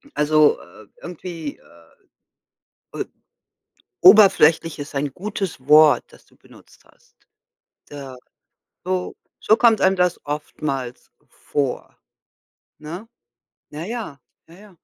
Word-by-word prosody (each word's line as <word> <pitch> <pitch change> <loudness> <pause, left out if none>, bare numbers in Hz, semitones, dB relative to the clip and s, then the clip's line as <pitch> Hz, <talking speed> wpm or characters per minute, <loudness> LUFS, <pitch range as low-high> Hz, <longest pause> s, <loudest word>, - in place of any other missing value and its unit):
Also, 150 0 +3
äh, 110 -2 -17
irgendwie, 170 -3 -8
äh 85 -1 -24 0.9
äh - - -1 1.0
oberflächlich 170 -5 +6
ist 145 +1 -8
ein 140 -1 -2
gutes 190 -8 -6
Wort, 150 -3 +6
das - - -20
du - - -27
benutzt - - -21
hast. - - -29 0.7
Da 135 -3 -10 0.7
so 185 0 -3 0.2
so 220 - +3
kommt 225 -4 +3
einem 190 0 +3
das 180 -1 0
oftmals 140 -4 -5 0.2
vor, 140 -3 -4 0.8
ne? 170 +9 -9 0.6
Na 155 +3 -7
ja 220 - -6 0.3
na 170 +4 -17
ja. 210 - -16
155 Hz, 110 wpm, -21 LUFS, 145-185 Hz, 1.0 s, oberflächlich